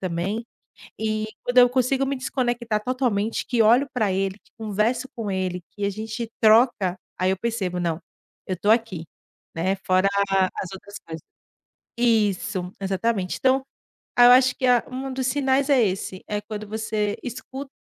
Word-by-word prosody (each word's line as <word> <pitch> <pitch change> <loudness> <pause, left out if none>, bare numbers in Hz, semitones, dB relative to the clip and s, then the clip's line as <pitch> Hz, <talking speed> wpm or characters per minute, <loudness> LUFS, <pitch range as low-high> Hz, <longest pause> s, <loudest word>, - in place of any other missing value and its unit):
também, 185 +5 -2 0.6
e 215 0 -1
quando 245 +1 +1
eu 245 0 +8
consigo 260 +2 +1
me 275 +1 -2
desconectar 240 -4 -1
totalmente 240 -4 -1
que 240 -3 +2
olho 245 +6 +4
pra 215 -6 +1
ele, 195 0 -1
que - - -31
converso 220 +4 -1
com 220 -4 -3
ele, 185 -2 -2
que 205 - -5
a - - 0
gente 220 +3 -5
troca, 220 -4 +4 0.2
aí 185 0 +2
eu 190 - -1
percebo: 200 -5 -2
"Não, 170 -2 -1 0.5
eu 185 - -1
estou 205 +4 0
aqui", 220 -7 +1 0.5
né, 185 +4 0
fora 185 +1 +3 0.2
a 190 -1 +4
as 185 - -5
outras 200 +1 -11
coisas. 160 0 -7 0.8
Isso, 210 -5 +1
exatamente, 195 0 -1
então, 265 0 +3 0.5
aí 245 - +8
eu 245 - +9
acho 255 0 +5
que 260 - 0
a 245 -2 +4
um 265 +1 -5
dos 260 -1 -1
sinais 275 +1 +1
é 275 -3 +5
esse, 185 0 -4
é 210 0 -1
quando 210 0 -7
você 215 -1 -2
escu 260 +3 -7
220 Hz, 170 wpm, -24 LUFS, 190-250 Hz, 0.8 s, eu